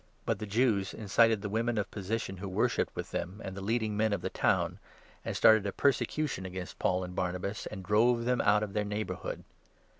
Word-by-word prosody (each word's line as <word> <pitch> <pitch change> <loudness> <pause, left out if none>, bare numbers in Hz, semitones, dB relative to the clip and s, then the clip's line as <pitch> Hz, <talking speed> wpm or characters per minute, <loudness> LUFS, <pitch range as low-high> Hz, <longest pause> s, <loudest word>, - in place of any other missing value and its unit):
But - - 0
the 105 - -5
Jews 105 -3 +1
incited 110 0 +3
the - - -1
50 100 - -7
women 115 +1 0
of 105 - -1
position 100 -1 -3
who 95 +1 -5
worshipped 95 - 0
with - - -5
them, 95 +4 -4
and 95 - -5
the 100 - -6
leading 110 +1 0
men 110 0 +2
of - - -1
the - - -3
town, - - +1 0.4
and - - -3
started 110 -2 +6
a - - -1
persecution 140 -1 0
against 95 -1 -7
Paul 90 0 +1
and 90 0 -6
Barnabas, 90 +3 -2
and 95 -3 -7
drove 115 +5 +3
them 125 0 +2
out 105 +1 +4
of 100 -2 -5
their 105 - +1
neighbour 105 -2 -3
hood. - - -6
105 Hz, 215 wpm, -31 LUFS, 95-110 Hz, 0.4 s, started